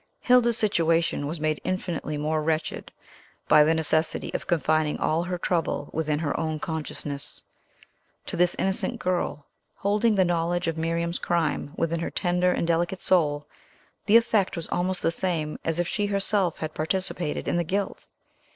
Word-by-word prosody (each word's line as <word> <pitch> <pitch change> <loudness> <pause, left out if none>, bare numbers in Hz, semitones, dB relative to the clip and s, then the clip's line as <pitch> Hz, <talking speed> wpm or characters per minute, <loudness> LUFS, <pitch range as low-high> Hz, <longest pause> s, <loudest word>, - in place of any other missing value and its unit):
Hilda's 240 -2 +4
situation 165 -7 +1
was 160 +2 -4
made 155 0 -1
infinitely 175 -4 -3
more 155 +1 0
wretched 155 0 -2 0.6
by 150 -1 +7
the 160 +2 +3
necessity 160 0 +1
of - - -4
Confining 155 -2 +1
all 160 +2 +1
her 180 +1 -3
trouble 170 -4 -1
within 155 -1 0
her 150 -2 -2
own 160 -1 -2
consciousness. 150 -3 -5 0.8
To - - -3
this 175 0 +2
innocent 190 0 +2
girl, 180 -5 -2 0.3
holding 210 +2 +1
the 190 -2 +4
knowledge 175 +1 0
of 165 - 0
Miriam's 170 +1 -1
crime 160 -3 -1
within 165 0 0
her 170 - -2
tender 180 0 +1
and 170 - 0
delicate 170 +2 0
soul, 150 -6 +2 0.6
the 215 +2 +8
effect 215 -5 +1
was 165 -2 -3
almost 180 +1 -1
the 165 - +2
same 165 -4 -2
as 165 +1 -1
if 175 - +1
she 205 +3 -1
herself 200 -3 +1
had 155 -1 -5
participated 175 -1 -2
in - - +1
the 175 - +1
guilt. 195 +4 -3
170 Hz, 160 wpm, -26 LUFS, 155-185 Hz, 0.8 s, the